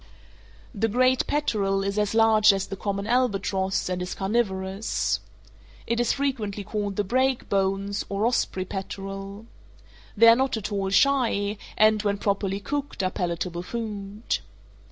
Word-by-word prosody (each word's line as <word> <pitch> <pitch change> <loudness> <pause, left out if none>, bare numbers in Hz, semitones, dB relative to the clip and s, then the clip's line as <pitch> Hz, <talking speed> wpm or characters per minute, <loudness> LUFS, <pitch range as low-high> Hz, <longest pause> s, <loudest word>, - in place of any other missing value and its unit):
The 225 +3 0
great 255 +3 +2
peterel 200 -9 0
is 200 +1 -1
as 210 +1 0
large 220 -1 +6
as 195 0 -1
the 195 - -6
common 200 0 -3
albatross, 200 -5 0
and 180 0 -2
is 180 - -4
carnivorous. 195 -1 -1 0.7
It 235 0 -1
is 240 - +2
frequently 225 -8 -2
called 205 0 -3
the 205 - +1
break 260 +5 +1
bones, 195 +1 0
or 200 +2 0
osprey 210 -6 0
peterel. 195 +2 -6 0.7
They 230 +2 +7
are 230 - +9
not 260 -1 0
at 215 0 -5
all 195 -1 -1
shy, 215 -4 +2 0.2
and, 215 0 +5
when 205 -1 0
properly 200 -1 -1
cooked, 285 -1 -3
are 185 - 0
palatable 175 -1 -3
food. 210 0 -4
205 Hz, 145 wpm, -25 LUFS, 195-230 Hz, 0.7 s, are